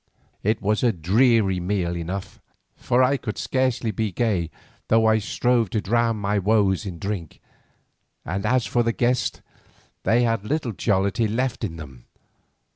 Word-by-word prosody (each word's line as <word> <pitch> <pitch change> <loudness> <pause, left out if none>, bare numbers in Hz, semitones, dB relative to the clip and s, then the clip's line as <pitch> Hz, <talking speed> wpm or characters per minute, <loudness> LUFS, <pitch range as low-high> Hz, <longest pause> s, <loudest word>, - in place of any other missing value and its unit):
It 110 +2 0
was 105 +1 +1
a 120 - +3
dreary 100 +2 +2
meal 90 -1 -1
enough, 90 +3 -5 0.4
for 125 +1 +2
I 135 +2 +3
could 105 -5 -5
scarcely 130 -3 0
be 105 +1 -2
gay 95 -5 0 0.4
though 110 0 +4
I 110 0 +4
strove 115 +1 +1
to 110 - -1
drown 115 +2 +1
my 100 0 0
woes 100 -1 +2
in 90 -3 -6
drink, 95 -3 -5 0.9
and 95 +5 -3
as 125 +2 +2
for 120 - +1
the 115 0 0
guests, 125 +1 0 0.6
they 120 +2 +3
had 115 -3 0
little 135 +1 -2
jollity 100 +2 +1
left 120 +3 -2
in 85 -7 -3
them. 65 -6 -11
110 Hz, 155 wpm, -23 LUFS, 95-120 Hz, 0.9 s, though